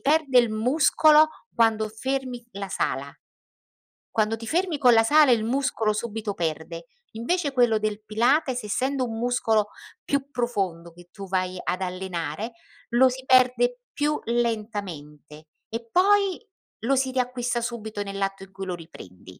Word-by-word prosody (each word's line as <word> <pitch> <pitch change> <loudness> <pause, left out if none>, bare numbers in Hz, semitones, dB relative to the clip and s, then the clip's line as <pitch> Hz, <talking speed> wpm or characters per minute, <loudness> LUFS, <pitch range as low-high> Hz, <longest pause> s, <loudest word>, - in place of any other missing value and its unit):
perde 290 -3 +3
il 240 -1 +4
muscolo 300 +6 +4 0.3
quando 225 -2 +3
fermi 255 +2 -3
la 200 0 -6
sala. 190 - -2 1.0
Quando 220 0 +1
ti 225 0 -9
fermi 345 +2 0
con 250 -3 +6
la 225 - +6
sala, 295 +3 +5
il 225 -3 +3
muscolo 230 -3 0
subito 215 -1 -4
perde. 165 +1 -4 0.3
Invece, 285 +7 -1
quello 240 -4 +3
del 215 0 -3
Pilates, 250 +5 +1
essendo 260 +5 -1
un 225 -2 -5
muscolo 225 -3 +1 0.4
più 280 0 -1
profondo 195 -10 -2
che 175 +1 -17
tu 195 -1 -9
vai 185 0 -1
ad 185 - -2
allenare, 185 +2 -4 0.4
lo 250 +2 +5
si 260 +1 -6
perde 250 -1 +3
più 300 +1 0
lentamente 200 -11 -4 0.2
e 230 +1 -6
poi, 395 - +3 0.4
lo 255 +5 +2
si 265 0 +1
riacquista 250 -1 -1
subito, 220 -3 -4
nell'atto 195 -1 -3
in 195 - -20
cui 195 0 -7
lo 180 - -3
riprendi. 160 - -13
230 Hz, 145 wpm, -25 LUFS, 195-260 Hz, 1.0 s, con